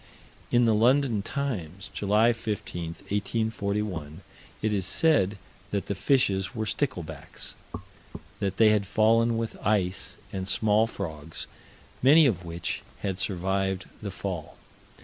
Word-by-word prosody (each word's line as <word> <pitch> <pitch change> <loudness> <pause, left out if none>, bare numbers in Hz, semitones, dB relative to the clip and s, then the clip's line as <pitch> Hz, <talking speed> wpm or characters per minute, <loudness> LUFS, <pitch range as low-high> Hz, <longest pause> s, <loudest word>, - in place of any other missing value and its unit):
In 120 0 +5
the 115 - +4
London 120 0 +3
Times, 100 - -4
July 105 +4 +3
15, 90 -7 -4
1841, 100 -5 -2 0.4
it 110 -1 +2
is 95 -3 0
said 140 - +3 0.3
that 100 -1 -1
the - - -2
fishes 100 -4 +1
were 110 -1 -1
sticklebacks; 90 - -3 0.9
that 100 -1 -1
they 110 -1 +7
had 105 -2 +2
fallen 115 +3 +3
with 115 -1 -3
ice 95 -3 0 0.2
and 95 -1 -3
small 110 +2 +3
frogs, 80 -6 -5 0.6
many 150 +5 +7
of 95 -10 +1
which 85 0 -3 0.2
had 95 -2 -2
survived 95 0 -1 0.2
the 105 - -4
fall. 95 -4 -5
100 Hz, 125 wpm, -27 LUFS, 95-115 Hz, 0.9 s, they